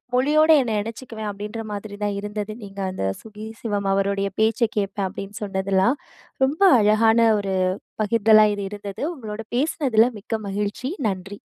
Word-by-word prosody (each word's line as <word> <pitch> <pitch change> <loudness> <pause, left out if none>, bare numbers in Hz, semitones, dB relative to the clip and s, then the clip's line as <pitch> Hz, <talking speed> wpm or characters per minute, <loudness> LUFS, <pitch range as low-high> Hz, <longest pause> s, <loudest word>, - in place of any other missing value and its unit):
மொழியோட 305 +5 +4
என்ன 225 -3 -2
இணச்சிக்குவேன் 220 -1 -6
அப்டின்ற 210 +3 -6
மாதிரி 205 0 -6
தான் 205 -1 0
இருந்தது. 210 +1 -4
நீங்க 195 0 -8
அந்த 185 - -3 0.2
"சுகி 215 0 -9
சிவம்" 205 -3 -1
அவருடைய 195 0 0
பேச்ச 220 +1 +2 0.2
கேட்பேன் 200 -1 -1
அப்டின்னு 200 +2 -8
சொன்னதெல்லாம். 195 +5 +1 0.5
ரொம்ப 295 +8 -3 0.2
அழகான 220 +2 +4 0.2
ஒரு 195 -1 -2 0.5
பகிர்தலா 215 0 +5
இது 200 -1 -4
இருந்தது. 205 -1 -7
உங்களோட 220 -5 -7
பேசனதில 255 -4 +2
மிக்க 220 +2 -3
மகிழ்ச்சி. 205 +6 -3 0.2
நன்றி. 195 +1 -5
210 Hz, 140 wpm, -23 LUFS, 200-225 Hz, 0.5 s, பகிர்தலா